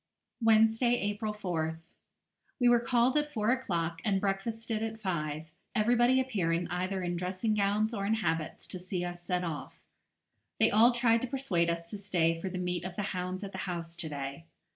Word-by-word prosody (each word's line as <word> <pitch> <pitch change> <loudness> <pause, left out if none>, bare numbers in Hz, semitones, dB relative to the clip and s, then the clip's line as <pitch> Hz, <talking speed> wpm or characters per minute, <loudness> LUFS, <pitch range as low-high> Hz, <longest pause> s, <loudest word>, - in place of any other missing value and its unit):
Wednesday, 225 +2 +4
April 210 -1 -2
4th. 165 -6 -2 0.8
We 245 - +4
were 240 0 +6
called 240 +2 +2
at 295 0 -3
four 220 -3 +1
o'clock, 170 -10 -1
and 200 -3 +2
breakfasted 215 +3 -2
at 220 0 -3
five, 155 -6 -2 0.3
everybody 240 +3 +4
appearing 180 -10 0
either 185 +2 -2
in 175 0 -1
dressing 185 +5 -1
gowns 210 +2 +1
or 200 -2 -2
in 220 - +3
habits 165 -6 -2
to 185 - -5
see 180 0 -3
us 175 0 -6
set 180 +1 -1
off. 165 -4 -5 0.8
They - - +5
all 225 +4 +7
tried 235 -1 +3
to 255 - -2
persuade 235 -11 0
us 170 0 -2
to 210 - -5
stay 165 -4 +1
for 190 - -2
the 185 - -5
meet 180 -1 -2
of 185 -1 -5
the 205 - -2
hounds 185 +1 -3
at 195 - -5
the 190 - -6
house 170 -1 -5
to 170 -2 -3
day. 140 +2 -5
195 Hz, 185 wpm, -31 LUFS, 175-225 Hz, 0.8 s, all